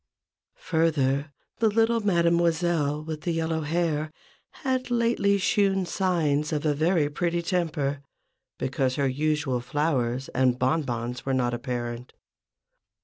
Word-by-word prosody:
Further, 150 -3 0 0.3
the 225 - +4
little 225 +2 +2
Mademoiselle, 170 -5 +1
with 155 +1 -6
yellow 165 -1 0
hair, 155 -1 -1 0.5
had 260 -2 -1
lately 230 -4 +2
shewn 195 -1 +2
signs 160 -6 0
of 150 0 -2
a 150 - +3
very 160 +1 +2
pretty 170 +3 -1
temper, 155 -6 -1 0.6
because 130 -1 -1
her 140 -1 +1
usual 145 -1 0
flowers 130 -2 -1
and 125 -1 +2
bon 130 +6 +2
bons 120 -2 -4
were 135 -1 0
not 120 -1 0
apparent. 120 -1 -4
155 Hz, 120 wpm, -26 LUFS, 135-175 Hz, 0.6 s, the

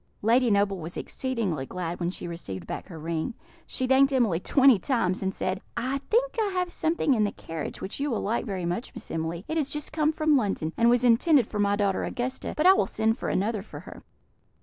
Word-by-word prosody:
Lady 240 +3 +4
Noble 200 -2 +2
was 165 +1 -7
exceedingly 225 - -2
glad 175 -1 -4
when 175 -1 0
she 180 - -6
received 95 - -6
back - - -6
her 165 - -9
ring. 165 +8 -3 0.3
She 260 - -2
thanked 265 +2 +4
Emily 230 -11 +2
twenty 265 +1 +5
times, 190 -5 0
and 190 0 0
said, 185 0 -3 0.2
"I 260 +3 -1
think 475 - 0
I 430 - +1
have 360 -1 -1
something 320 -4 +1
in 220 -4 +2
the 205 - 0
carriage 160 -2 -7
which 190 - -5
you 290 +1 0
will 235 - -1
like 225 +4 0
very 190 -6 -4
much, 175 +9 -3
Miss - - -9
Emily; 165 +3 -3
it 320 +1 -1
is 285 -2 -1
just 295 +1 -5
come 310 -1 +2
from 310 -1 +2
London, 195 - 0
and 235 0 +4
was 245 0 +3
intended 250 +3 +5
for 210 - -5
my 205 0 +3
daughter 200 -2 0
Augusta; 255 +2 -3
but 305 - +1
I 375 - +9
will - - +1
send 220 +2 0
for - - -2
another 210 +2 0
for 205 - -10
her." - - -11
225 Hz, 225 wpm, -27 LUFS, 185-270 Hz, 0.3 s, I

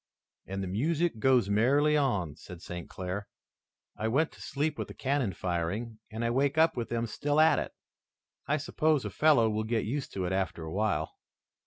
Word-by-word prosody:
"And 95 +1 -3
the - - -3
music 150 - 0
goes 125 -3 +4
merrily 135 +9 +3
on," 100 - +1
said 90 +2 -11
St. 90 -1 -7
Clair. 95 +3 -5 0.7
"I 110 - -2
went 140 +8 +2
to - - -16
sleep 150 +1 -2
with - - -3
the - - -10
cannon 135 -5 0
firing, 95 +6 -3
and 115 +1 -3
I 115 - +1
wake 140 +4 +1
up 160 +1 +4
with 120 -2 -3
them 115 0 -1
still 145 +6 0
at 160 +1 +6
it. - - -4 0.8
I 150 - +2
suppose 155 -1 +1
a - - -3
fellow 150 -7 +4
will 110 0 0
get 110 0 -1
used 135 +5 -3
to 95 -2 -2
it 90 - -1
after 95 -3 -1
a 80 - -6
while." 100 -6 0
115 Hz, 195 wpm, -30 LUFS, 95-145 Hz, 0.8 s, at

